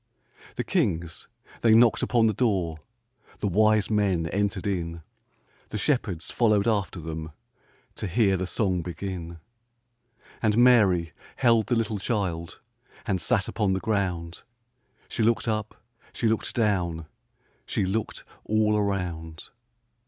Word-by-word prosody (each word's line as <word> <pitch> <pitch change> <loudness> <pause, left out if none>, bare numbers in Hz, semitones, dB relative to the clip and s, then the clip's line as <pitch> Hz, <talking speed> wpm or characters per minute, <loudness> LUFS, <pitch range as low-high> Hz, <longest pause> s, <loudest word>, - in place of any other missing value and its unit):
The - - -2
kings 85 0 -1 0.3
they 110 -1 +5
knocked 115 -1 +5
upon 120 -2 +2
the 110 - +3
door, 95 -8 0 0.6
The 105 - -2
wise 110 +2 +3
men 100 -6 +1
entered 100 0 -1
in, 85 -4 -3 0.7
The 105 - -4
shepherds 105 - -1
followed 105 -3 +2
after 100 -4 0
them 80 -1 -6 0.6
To 105 - -3
hear 100 +1 +2
the 95 0 -2
song 90 -1 0
begin. 85 -1 -6 1.0
And 110 -1 +2
Mary 100 -10 +4 0.2
held 115 -4 +3
the 120 - +1
little 110 -2 -1
child 90 -7 -3 0.5
And 95 -2 -1
sat 100 +1 +1
upon 105 -4 0
the 95 - 0
ground; 90 -6 -2 0.7
She - - -4
looked 115 +2 +2
up, 110 -1 -2 0.3
she 115 - 0
looked 110 0 -1
down, 90 -8 0 0.6
She 100 - 0
looked 105 +3 -3 0.2
all 105 0 +2
around. 90 -6 -3
100 Hz, 130 wpm, -26 LUFS, 85-110 Hz, 1.0 s, they